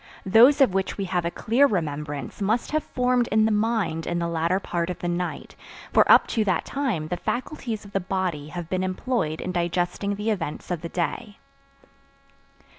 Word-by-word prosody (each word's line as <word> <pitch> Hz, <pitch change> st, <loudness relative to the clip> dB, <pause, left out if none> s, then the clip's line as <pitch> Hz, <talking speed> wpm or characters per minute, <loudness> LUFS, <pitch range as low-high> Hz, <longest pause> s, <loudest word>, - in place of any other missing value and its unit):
Those 240 Hz, +9 st, +6 dB
of 255 Hz, -9 st, +5 dB
which 190 Hz, 0 st, -1 dB
we 200 Hz, -, -2 dB
have 180 Hz, -2 st, -1 dB
a -, -, +1 dB
clear 240 Hz, +10 st, +3 dB
remembrance 150 Hz, -, -3 dB
must 220 Hz, +4 st, 0 dB
have 310 Hz, 0 st, +1 dB
formed 250 Hz, -1 st, +1 dB
in 215 Hz, +1 st, +3 dB
the 220 Hz, -, +2 dB
mind 210 Hz, -7 st, 0 dB
in 175 Hz, -, -1 dB
the 170 Hz, 0 st, -1 dB
latter 170 Hz, +3 st, 0 dB
part 175 Hz, -2 st, -2 dB
of 180 Hz, -, -3 dB
the 175 Hz, -, -4 dB
night, 175 Hz, 0 st, -3 dB, 0.4 s
for -, -, +5 dB
up -, -, +8 dB
to 225 Hz, -, +1 dB
that 185 Hz, -5 st, 0 dB
time 230 Hz, -, -2 dB
the 175 Hz, -, -2 dB
faculties 240 Hz, -, -4 dB
of 200 Hz, -, -12 dB
the 195 Hz, -, 0 dB
body 180 Hz, -5 st, -2 dB
have 175 Hz, +1 st, -6 dB
been 185 Hz, +1 st, -1 dB
employed 185 Hz, -4 st, -1 dB
in 185 Hz, -, -3 dB
digesting 175 Hz, +3 st, -1 dB
the 210 Hz, +2 st, -1 dB
events 175 Hz, -4 st, -4 dB
of 175 Hz, -3 st, -2 dB
the 170 Hz, -, -5 dB
day. 185 Hz, +4 st, -3 dB
185 Hz, 190 wpm, -25 LUFS, 170-220 Hz, 0.4 s, up